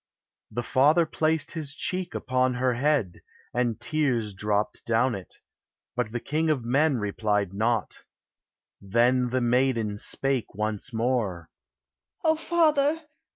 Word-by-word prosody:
The 120 +2 -3
father 150 +7 +4
placed 160 0 0
his 150 -4 -4
cheek 185 -1 -3
upon 130 0 +1
her 125 0 +1
head, 130 - 0 0.3
And 120 -2 0
tears 120 -5 0
dropt 105 +2 -1
down 120 +2 +2
it; 95 -2 -7 0.6
but 120 -3 -1
the 120 - -2
king 155 +6 -1
of 135 -6 0
men 140 +3 +2
Replied 105 -2 -1
not. 110 +1 -1 0.8
Then 120 +5 +2
the 130 +1 0
maiden 120 -4 +1
spake 135 -4 -2
once 110 +3 -2
more: 110 -8 -1 0.7
"O 315 - +4
father! 315 -2 +2
125 Hz, 125 wpm, -26 LUFS, 110-145 Hz, 0.8 s, father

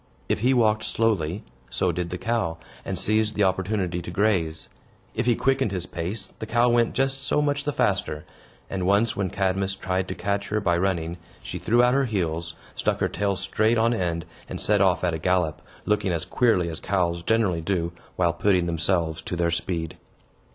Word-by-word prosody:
If - - 0
he 125 +5 +3
walked 110 -4 +3
slowly, 100 -5 0 0.3
so 60 - +1
did 90 -1 -3
the 90 - -4
cow, 110 -7 -1 0.3
and - - -3
seized 110 0 +1
the 105 - +2
opportunity 95 -2 0
to 85 - -7
graze. 90 -4 0 0.5
If 115 +2 -1
he 120 - +4
quickened 135 -4 +1
his 90 -2 -2
pace, 95 +4 -4
the 110 - -5
cow 120 +2 +3
went 120 -1 +2
just 135 +1 +1
so 135 - +1
much 145 0 0
the 145 - +1
faster; 90 - 0 0.4
and 95 -2 -2
once, 105 +4 +3
when 100 -2 -1
Cadmus 95 +1 0
tried 95 -1 -2
to - - -4
catch 100 0 -2
her 105 - +1
by 90 -4 +1
running, 85 -2 -1 0.3
she - - -5
threw 120 +2 +3
out 125 0 +4
her 135 0 +3
heels, 85 -7 -2 0.2
stuck - - 0
her - - +1
tail 100 -1 0
straight 110 +5 +1
on 115 +1 +3
end, 85 -6 -1 0.2
and - - -5
set 105 -1 +3
off 95 -2 +3
at 85 -2 +1
a 80 - -2
gallop, 85 -3 +1 0.2
looking 105 -2 +1
as 85 -2 -2
queerly 110 -8 +2
as 80 -1 -4
cows 85 -3 0
generally 100 -4 +1
do, 85 -1 -1 0.2
while 85 -2 +2
putting 95 -4 +2
themselves 85 -1 +1
to 90 - -4
their 85 -1 +1
speed. 85 -1 -3
95 Hz, 195 wpm, -25 LUFS, 85-110 Hz, 0.5 s, he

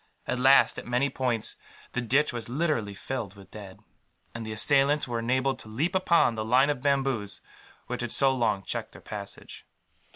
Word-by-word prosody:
At 125 - -2
last, 135 +2 +5
at - - -11
many 125 +3 +1
points, 120 -5 -1 0.3
the 125 - -2
ditch 135 +4 +2
was 120 -1 -5
literally 125 -8 -1
filled 110 -3 -5
with 100 -1 -15
dead; 100 -2 -10 0.5
and 115 - -6
the 110 - -6
assailants 140 +6 +3
were 120 -1 -2
enabled 130 +3 0
to - - -11
leap 135 +11 -1
upon 170 -8 +3
the 110 -1 -3
line 130 +6 +4
of 135 -4 -4
bamboos 135 -7 0 0.5
which - - -4
had - - -3
so 135 -1 +4
long 110 -6 0
checked - - -5
their - - -13
passage. - - -8
125 Hz, 185 wpm, -27 LUFS, 110-135 Hz, 0.5 s, last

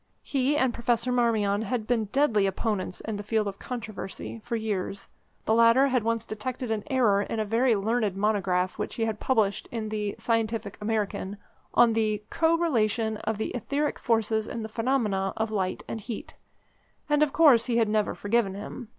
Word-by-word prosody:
He 275 +1 +1
and 260 -4 +2
Professor 235 +1 0
Marmion 220 -4 +2
had 225 0 -2
been 230 -1 +1
deadly 215 -3 +2
opponents 195 -2 -2
in 220 -2 -4
the - - -4
field 210 0 0
of 195 0 -5
controversy 220 -2 -6
for 240 -1 -3
years. 200 -3 -3 0.4
The 220 - +2
latter 230 +4 +5
had 250 -2 +2
once 230 0 0
detected 240 +2 -4
an 215 -2 -1
error 235 -7 +3
in 220 - -3
a 215 - 0
very 230 +3 +3
learned 215 0 0
monograph 190 -3 0
which - - -3
he 225 - 0
had 220 -1 -3
published 220 -6 +1
in 220 -2 -3
the 210 -1 -2
Scientific 225 -2 -1
American 210 -2 -2 0.4
on 235 -1 +6
the 215 -2 0
"Co 330 0 +3
Relation 225 -8 +1
of 220 0 -3
the 220 - -2
Etheric 285 +4 -2
Forces 220 -2 +1
in 230 - -4
the 220 - -5
Phenomena 215 -5 0
of 220 0 -1
Light 190 -3 -2
and 225 - -5
Heat," 230 +1 -7 0.7
and 295 0 +2
of 300 -2 +3
course 270 -8 +5
he 235 -2 +1
had 225 -2 +3
never 210 0 0
forgiven 205 -2 0
him. 215 +3 -7
220 Hz, 185 wpm, -27 LUFS, 210-240 Hz, 0.7 s, on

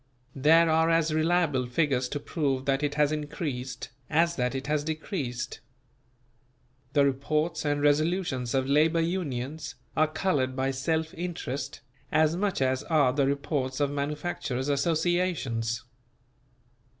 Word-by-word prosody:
There 160 +5 +5
are 160 +1 +3
as 165 -1 +2
reliable 155 -5 +2
figures 130 -1 +1
to 145 - -3
prove 140 -3 -1
that 135 0 +1
it 145 -1 -1
has 150 0 +3
increased, 145 -4 -4 0.2
as 170 +2 +2
that 125 -1 -1
it 135 - -3
has 150 0 0
decreased. 150 - -4 1.3
The 145 -2 +5
reports 150 +5 0
and 145 0 0
resolutions 145 -4 +1
of 130 0 +1
Labour 155 +4 +3
Unions 155 -3 -3 0.2
are 155 0 +4
coloured 150 -5 0
by 135 0 0
self 160 +5 -1
interest 155 -6 -4 0.3
as 155 +1 +3
much 190 -6 0
as 130 0 +1
are 145 -6 +3
the 140 -1 +2
reports 140 -2 -1
of 145 -1 +1
Manufacturers' 145 -2 -2
Associations. 150 -7 0
145 Hz, 130 wpm, -28 LUFS, 135-160 Hz, 1.3 s, There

